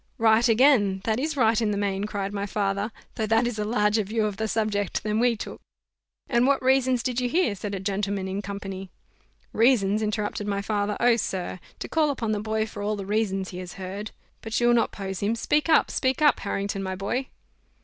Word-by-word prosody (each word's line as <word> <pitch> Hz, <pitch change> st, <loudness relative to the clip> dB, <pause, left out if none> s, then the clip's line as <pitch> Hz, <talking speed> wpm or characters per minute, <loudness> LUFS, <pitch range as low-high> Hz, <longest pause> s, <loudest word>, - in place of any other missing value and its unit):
"Right 225 Hz, +2 st, +4 dB
again, 220 Hz, -6 st, +4 dB
that 220 Hz, +2 st, 0 dB
is 305 Hz, +2 st, -2 dB
right 225 Hz, -3 st, +3 dB
in 220 Hz, -, +1 dB
the 205 Hz, -, -1 dB
main," 200 Hz, 0 st, -1 dB
cried 200 Hz, -2 st, -3 dB
my 200 Hz, 0 st, -2 dB
father; 200 Hz, +1 st, -1 dB, 0.2 s
"though 220 Hz, -2 st, -2 dB
that 225 Hz, +2 st, +3 dB
is 240 Hz, -3 st, -2 dB
a -, -, 0 dB
larger 210 Hz, 0 st, +2 dB
view 215 Hz, +2 st, -1 dB
of 205 Hz, -2 st, -3 dB
the 220 Hz, -, -1 dB
subject 215 Hz, -3 st, -1 dB
than 215 Hz, +1 st, 0 dB
we 240 Hz, 0 st, +3 dB
took." -, -, -7 dB, 0.7 s
"And 240 Hz, +1 st, +3 dB
what 280 Hz, -1 st, +3 dB
reasons 260 Hz, -2 st, +3 dB
did 250 Hz, 0 st, -1 dB
you 245 Hz, -, 0 dB
hear?" 325 Hz, -, +2 dB
said 200 Hz, 0 st, -5 dB
a -, -, -4 dB
gentleman 195 Hz, 0 st, -2 dB
in 190 Hz, +2 st, -3 dB
company. 195 Hz, -1 st, -6 dB, 0.6 s
"Reasons!" 220 Hz, -3 st, +3 dB
interrupted 210 Hz, -1 st, -2 dB
my 200 Hz, -1 st, -1 dB
father: 205 Hz, 0 st, -1 dB
"oh! 240 Hz, -1 st, +4 dB
sir, 185 Hz, -4 st, -3 dB, 0.2 s
to -, -, -6 dB
call 315 Hz, -2 st, +2 dB
upon 235 Hz, -6 st, -2 dB
the 210 Hz, -, 0 dB
boy 220 Hz, +1 st, -1 dB
for 205 Hz, -1 st, -8 dB
all 210 Hz, +1 st, -1 dB
the 200 Hz, -2 st, -6 dB
reasons 195 Hz, -2 st, -1 dB
he 180 Hz, -, -7 dB
has 180 Hz, -1 st, -7 dB
heard 195 Hz, +3 st, -6 dB, 0.3 s
But 225 Hz, 0 st, -2 dB
you'll 240 Hz, 0 st, +4 dB
not 235 Hz, -, +2 dB
pose 195 Hz, -2 st, -5 dB
him: 210 Hz, +3 st, 0 dB
speak 295 Hz, +7 st, 0 dB
up, 315 Hz, -, +4 dB
speak 260 Hz, 0 st, 0 dB
up, 295 Hz, -3 st, +4 dB
Harrington, 200 Hz, -1 st, -2 dB
my 190 Hz, -1 st, -3 dB
boy!" 240 Hz, +8 st, -2 dB
210 Hz, 215 wpm, -25 LUFS, 200-235 Hz, 0.7 s, Right